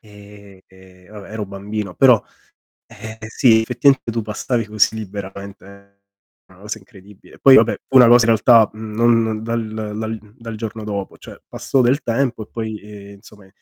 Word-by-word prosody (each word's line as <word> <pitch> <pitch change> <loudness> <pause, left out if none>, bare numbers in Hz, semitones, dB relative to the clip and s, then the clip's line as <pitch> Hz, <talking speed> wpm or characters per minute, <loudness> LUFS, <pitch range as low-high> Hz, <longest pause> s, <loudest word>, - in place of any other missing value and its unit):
ehm, 100 -2 -16 0.5
vabbè, 105 -1 -12
ero 110 -1 -4
bambino. 100 0 -6
Però, 125 -5 +5 0.6
ehm, 110 0 -11
sì, 110 0 +3
effettivamente 125 +1 +1
tu 115 0 -3
passavi 110 +2 -3
così 110 +1 +1
liberamente, 100 -1 -10 0.5
una 95 0 -21
cosa 105 +1 -6
incredibile. 100 -3 -18
Poi, 135 -1 +7
vabbè, 115 0 +4
fu 135 - -1
una 125 -2 +9
cosa 120 0 +6
in 115 - +4
realtà, 115 -1 +5
mhmm, 110 0 -9
non 115 -1 +1
dal 110 -2 -4
dal 110 0 -4 0.2
dal 115 -3 -9
giorno 110 -1 -6
dopo, 100 -2 -6
cioè - - -13
passò 135 - -1
del 130 +5 +1
tempo 115 -2 -2
e - - -26
poi, 110 -2 -6
ehm, 100 -1 -13
insomma 100 0 -18
110 Hz, 165 wpm, -19 LUFS, 100-115 Hz, 0.6 s, una